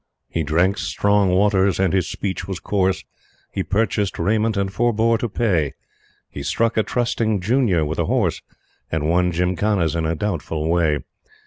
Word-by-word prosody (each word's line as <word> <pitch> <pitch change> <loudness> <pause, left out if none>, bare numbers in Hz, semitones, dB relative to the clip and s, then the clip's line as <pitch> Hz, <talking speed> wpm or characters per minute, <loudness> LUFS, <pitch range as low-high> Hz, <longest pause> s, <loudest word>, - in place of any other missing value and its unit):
He 85 - -1
drank 85 +6 +1
strong 100 -1 +2
waters 95 0 +2
and 95 -2 +2
his 95 -2 +1
speech 95 -3 -4
was 95 -2 -4
coarse; 95 -2 0 0.5
He 95 - -2
purchased 100 0 0
raiment 110 +4 +1
and 95 -1 -1
forebore 115 0 +2
to 120 - -2
pay; 90 - 0 0.5
He - - -8
struck 115 0 0
a 110 - +3
trusting 115 -2 0
junior 100 - +2
with 80 +2 -3
a - - +1
horse, - - 0 0.5
And 80 -1 -1
won 90 +2 +2
Gymkhanas 90 0 0
in 80 -1 0
a 85 - 0
doubtful 80 -5 -2
way. 80 -4 +2
95 Hz, 160 wpm, -21 LUFS, 85-105 Hz, 0.5 s, a